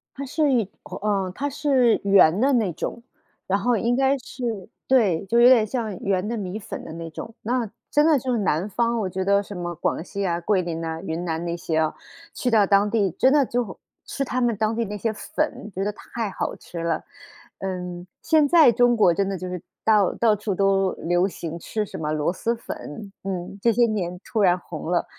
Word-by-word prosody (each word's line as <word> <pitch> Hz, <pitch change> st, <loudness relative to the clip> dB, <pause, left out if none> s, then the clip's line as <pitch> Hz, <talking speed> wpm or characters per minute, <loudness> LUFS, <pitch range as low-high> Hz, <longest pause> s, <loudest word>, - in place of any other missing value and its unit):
它 280 Hz, -, -5 dB
是 295 Hz, +2 st, +1 dB
一 225 Hz, -6 st, +1 dB
口， -, -, -8 dB
呃， 195 Hz, -3 st, 0 dB
它 285 Hz, +6 st, -2 dB
是 270 Hz, -5 st, +2 dB
圆 195 Hz, -3 st, +5 dB
的 275 Hz, +1 st, +3 dB
那 215 Hz, -7 st, +2 dB
种， 235 Hz, -, -5 dB, 0.5 s
然 195 Hz, +1 st, +1 dB
后 240 Hz, +1 st, +2 dB
应 235 Hz, +4 st, +1 dB
该 270 Hz, +1 st, +3 dB
是 240 Hz, -6 st, -5 dB, 0.2 s
对， 205 Hz, -10 st, +3 dB
就 230 Hz, +5 st, +1 dB
是 235 Hz, -, +6 dB
有 250 Hz, -, +9 dB
点 230 Hz, -4 st, +6 dB
像 220 Hz, -4 st, -3 dB
圆 195 Hz, 0 st, 0 dB
的 235 Hz, -, -2 dB
米 200 Hz, +1 st, -4 dB
粉 -, -, -7 dB
的 -, -, -8 dB
那 165 Hz, 0 st, -6 dB
种。 225 Hz, -, -8 dB
那 240 Hz, -1 st, -1 dB, 0.2 s
真 295 Hz, +1 st, +3 dB
的 310 Hz, -4 st, +4 dB
就 255 Hz, +1 st, -3 dB
是 235 Hz, -, +1 dB
南 180 Hz, -2 st, 0 dB
方， 235 Hz, +2 st, 0 dB
我 190 Hz, -3 st, -1 dB
觉 190 Hz, +1 st, -2 dB
得 200 Hz, +1 st, +3 dB
什 205 Hz, 0 st, -9 dB
么 175 Hz, -1 st, -4 dB
广 160 Hz, -, -1 dB
西 200 Hz, +1 st, -4 dB
啊、 170 Hz, -2 st, 0 dB
桂 190 Hz, +1 st, +2 dB
林 165 Hz, -1 st, -4 dB
呐、 160 Hz, 0 st, -4 dB
云 170 Hz, -1 st, -4 dB
南 165 Hz, -1 st, -2 dB
那 170 Hz, 0 st, -2 dB
些 165 Hz, -2 st, -2 dB
啊， 155 Hz, -1 st, +1 dB, 0.4 s
去 250 Hz, -, -1 dB
到 215 Hz, -3 st, +5 dB
当 200 Hz, +1 st, +3 dB
地， 205 Hz, -5 st, +1 dB
真 260 Hz, -, +3 dB
的 285 Hz, -2 st, +4 dB
就 240 Hz, -5 st, -3 dB, 0.3 s
吃 275 Hz, -, -3 dB
它 255 Hz, 0 st, -2 dB
们 235 Hz, -3 st, +2 dB
当 215 Hz, +1 st, 0 dB
地 230 Hz, -, 0 dB
那 210 Hz, 0 st, -5 dB
些 220 Hz, +2 st, -1 dB
粉， 300 Hz, -4 st, -3 dB
觉 190 Hz, +2 st, -2 dB
得 210 Hz, -, 0 dB
太 225 Hz, 0 st, -5 dB
好 -, -, -3 dB
吃 170 Hz, -1 st, -8 dB
了。 165 Hz, -2 st, -1 dB, 0.6 s
嗯， 180 Hz, -2 st, -5 dB, 0.2 s
现 315 Hz, -2 st, +4 dB
在 315 Hz, -5 st, +7 dB
中 240 Hz, +1 st, +3 dB
国 180 Hz, -5 st, +5 dB
真 195 Hz, +3 st, 0 dB
的 195 Hz, -, -2 dB
就 185 Hz, -, -6 dB
是 180 Hz, -2 st, -5 dB, 0.2 s
到 210 Hz, -4 st, +4 dB
到 225 Hz, -2 st, +3 dB
处 210 Hz, 0 st, -3 dB
都 195 Hz, -1 st, +2 dB
流 175 Hz, +2 st, +1 dB
行 170 Hz, -3 st, -6 dB
吃 215 Hz, +5 st, -3 dB
什 -, -, -8 dB
么 150 Hz, -1 st, -2 dB
螺 155 Hz, +3 st, 0 dB
蛳 235 Hz, +5 st, -1 dB
粉， 200 Hz, -3 st, -8 dB
嗯， 190 Hz, 0 st, -4 dB
这 235 Hz, -, +4 dB
些 240 Hz, +2 st, +4 dB
年 180 Hz, -5 st, -2 dB
突 220 Hz, -1 st, -1 dB
然 180 Hz, -2 st, +4 dB
红 160 Hz, -2 st, -7 dB
了。 175 Hz, -1 st, +1 dB
205 Hz, 245 characters per minute, -24 LUFS, 180-235 Hz, 0.6 s, 有